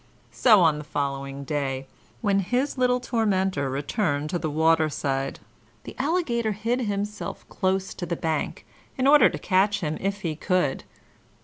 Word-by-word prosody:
So 215 -6 +5
on 155 -3 +3
the - - -6
following 140 -1 -3
day, 135 -2 -2 0.4
when 200 -2 +2
his 250 +9 0
little 250 -1 +2
tormentor 190 - 0
returned 145 +2 -1
to 175 - -1
the 160 - -2
waterside, 150 -3 +1 0.4
the - - -9
Alligator 260 -8 0
hid 230 +5 -1
himself 205 -1 -4
close 190 0 -1
to 175 - -6
the 170 - -1
bank, 160 -1 -2 0.3
in 260 - +1
order 285 -1 +7
to - - -5
catch 195 +2 +2
him 155 -2 -2
if 195 +1 -2
he 165 -4 -2
could. 180 -4 0
185 Hz, 150 wpm, -25 LUFS, 150-215 Hz, 0.4 s, order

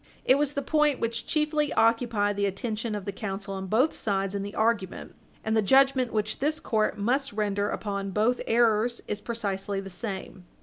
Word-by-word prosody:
It 265 +2 +5
was 290 -1 +1
the 280 - -2
point 300 -2 +2
which 230 0 -2
chiefly 300 -1 +1
occupied 225 -3 +2
the 200 0 +1
attention 215 +2 -3
of 205 -2 -5
the 200 - -2
counsel 195 0 -5
on 190 0 -5
both 250 - +2
sides 195 -2 -1
in 200 - -2
the 200 +1 -6
argument 220 -4 -1 0.3
and 220 0 0
the 220 - +4
judgment 265 +2 +4
which 215 -1 -1
this 305 +3 0
court 215 -2 0
must 250 +5 0
render 205 -1 0
upon 200 -1 -3
both 220 +6 +1
errors 230 0 +2
is 210 0 -3
precisely 200 -4 -3
the 195 0 -7
same. 190 -1 -6
215 Hz, 185 wpm, -27 LUFS, 200-245 Hz, 0.3 s, It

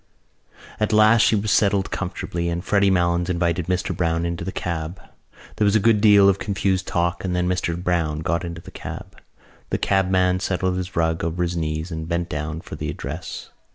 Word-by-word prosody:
At 110 0 +1
last 110 +1 +6
she 115 - +4
was 105 0 0
settled 100 -1 +2
comfortably 90 -2 -3
and 85 +2 -3
Freddy 100 -1 +3
Malins 85 -1 +1
invited 85 -1 0
Mr 90 0 -1
Browne 85 -1 0
into 85 0 -3
the 95 - -4
cab. 85 +1 -4 0.6
There - - +1
was 100 +1 +3
a - - +5
good 105 0 +3
deal 100 -2 +7
of 100 0 +3
confused 95 -2 -1
talk, 85 0 -1
and 90 -2 -1
then 90 0 0
Mr 90 -2 -1
Browne 85 -4 -1
got 85 +2 -1
into 85 -1 -6
the - - -12
cab. - - -9 0.5
The - - 0
cabman 95 -1 +2
settled 90 0 -1
his 90 0 -5
rug 80 -1 0
over 85 +2 -1
his 85 0 -2
knees, 80 +1 -3
and 80 -1 -5
bent 85 0 -1
down 75 +2 -4
for - - -11
the - - -4
address. - - -6
90 Hz, 195 wpm, -22 LUFS, 85-95 Hz, 0.6 s, deal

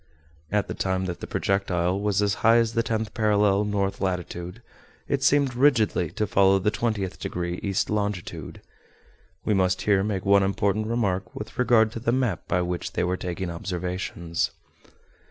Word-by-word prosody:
At 105 -1 +1
the - - -4
time 95 0 -1
that 90 -1 -4
the - - -7
projectile 95 -2 0
was 105 0 +1
as 100 -1 +2
high 115 +1 +6
as 115 -1 +2
the 115 - +2
tenth 110 -1 -2
parallel, 105 -3 +3
north 100 -1 -1
latitude, 90 -1 -4 0.4
it 140 - 0
seemed 140 -1 +3
rigidly 120 - +3
to 105 - 0
follow 95 -1 +4
the 95 +2 +1
twentieth 105 -3 -2
degree, 85 0 -3
east 100 0 0
longitude. 105 -3 -3 0.8
We 105 - +2
must 95 -1 +1
here 100 -2 +3
make 100 -3 -2
one 100 0 +5
important 100 +2 0
remark 100 -5 -1
with 110 +3 -8
regard 115 -3 +4
to 115 - -6
the 115 +1 0
map 120 -8 -1
by 90 0 +1
which 90 -1 -4
they - - 0
were 90 +1 0
taking 90 -1 -4
observations. 90 -1 -3
100 Hz, 170 wpm, -25 LUFS, 90-110 Hz, 0.8 s, high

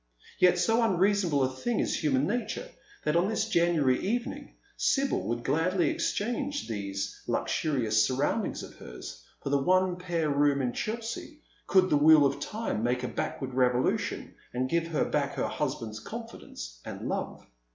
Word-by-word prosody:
Yet 180 0 +5
so 225 +6 +3
unreasonable 190 -7 +2
a - - +3
thing 235 - -1
is - - 0
human 140 -2 +2
nature, 245 - -2 0.4
that 150 - +1
on 175 +4 +3
this 220 - 0
January 170 -9 +3
evening 235 +5 -3 0.2
Sibyl 275 -1 +1
would 120 +1 -2
gladly 165 +7 +2
exchange 265 +6 -2
these 100 -2 -4
luxurious 115 -8 +1
surround 140 - +1
ings - - -5
of - - -10
hers - - -9 0.2
for 140 - -2
the 140 -1 +3
one 185 +2 +3
pair 170 -4 -1
room 140 0 +3
in 125 -3 -1
Chelsea, 235 +7 -5 0.2
could 185 -1 +4
the 150 - +5
wheel 150 0 +7
of 140 0 0
time 220 - -3
make 125 +2 0
a - - -1
backward 130 +1 -4
revolution 125 -1 +1 0.2
and 130 +1 -1
give 170 0 +1
her 165 -2 0
back 140 -1 -1
h';^r 125 - 0
husband's 110 -2 -3
confidence 210 - -8
and - - -6
love. - - -4
155 Hz, 160 wpm, -29 LUFS, 130-200 Hz, 0.4 s, wheel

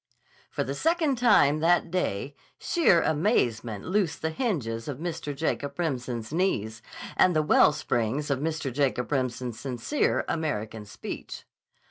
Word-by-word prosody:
For - - -2
the 135 - -3
second 315 - +1
time 180 - +5
that 165 +1 +2
day 140 - -1 0.2
sheer 285 - +3
amazement 120 - 0
loosed 185 -4 0
the 160 - 0
hinges 140 - -2
of 140 -4 -4
Mr. 165 -2 -4
Jacob 140 -2 -2
Remsen's 125 -7 -3
knees, 115 - 0 0.3
and 180 -2 +4
the 155 - +3
wellsprings 145 -2 +2
of 135 - +1
Mr. 155 -3 -2
Jacob 135 -2 0
Remsen's 125 -3 -2
sincere 135 - -1
American 110 -9 -3
speech. 105 - -8
145 Hz, 130 wpm, -27 LUFS, 120-170 Hz, 0.3 s, time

